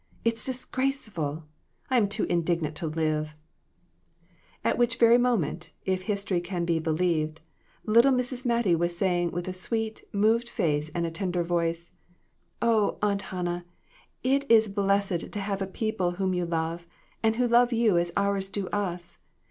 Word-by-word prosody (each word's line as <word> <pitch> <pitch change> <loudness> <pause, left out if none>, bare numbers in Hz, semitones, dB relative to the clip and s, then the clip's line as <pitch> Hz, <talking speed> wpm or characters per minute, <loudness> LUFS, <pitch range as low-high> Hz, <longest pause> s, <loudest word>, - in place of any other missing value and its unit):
It's 230 -1 +1
disgraceful! 250 - -2 0.5
I'm 230 -6 +3
too 210 +1 -1
indignant 170 -2 0
to 165 - -1
live! 155 -1 -1 0.6
" 170 +1 -35
At - - +1
which 240 -1 +3
very 235 0 +6
moment, 220 -9 0
if 185 -1 0
history 200 -2 -1
can 175 -1 -3
be 170 -1 +1
believed, 160 -1 0 0.5
little 235 +5 +5
Mrs. 250 0 -1
Mattie 235 -6 +2
was 170 +1 0
saying, 175 -2 +1
with 175 +1 -4
a 185 - -3
sweet, 220 +4 -3
moved 225 +4 +2
face 150 -5 0
and 170 -1 -1
tender 180 -1 -1
voice 170 0 -1 0.7
"Oh, 225 -3 +2
Aunt 200 -1 +2
Hannah, 175 -1 -3 0.6
it 275 +2 +1
is 225 -1 +6
blessed 200 -3 0
to 205 - -4
have 195 0 -3
a 190 - -1
people 190 -3 -1
whom 190 +1 -1
you 180 -1 -1
love, 165 +1 -2 0.3
and 225 0 +2
who 245 +1 +2
love 240 +1 +4
you 225 -6 +3
as 170 0 -1
ours 200 -1 0
do 195 -1 -3
us. 175 -4 -4
190 Hz, 155 wpm, -27 LUFS, 170-225 Hz, 0.7 s, very